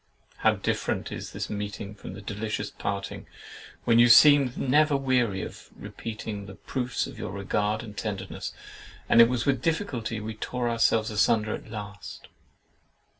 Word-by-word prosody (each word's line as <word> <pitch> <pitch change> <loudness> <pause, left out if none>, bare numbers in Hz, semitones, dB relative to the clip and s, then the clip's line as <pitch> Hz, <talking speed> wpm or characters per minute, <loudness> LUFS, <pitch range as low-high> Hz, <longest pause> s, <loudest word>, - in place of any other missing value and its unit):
—How - - +3
different - - -2
is - - -6
this - - -4
meeting 105 0 -5
from 95 -3 -9
that 100 0 -11
delicious 105 +1 -3
parting, 100 -1 -4 0.6
when 115 -1 +4
you 120 +1 +7
seemed 140 0 +7
never 145 +2 +3
weary 125 -7 +1
of - - -9
repeating 105 -2 -6
the 95 - -9
proofs 125 +3 -2
of - - -10
your - - -4
regard 105 +2 -1
and 105 - -10
tenderness, 105 -3 -4 0.6
and 115 - +7
it 115 - +7
was 125 -1 -1
with 140 -2 +1
difficulty 145 - -1
we 110 +1 -5
tore 120 +3 -3
ourselves 115 -1 +2
asunder 105 +1 +2
at - - -7
last! 105 -2 -8
110 Hz, 155 wpm, -27 LUFS, 105-125 Hz, 0.6 s, you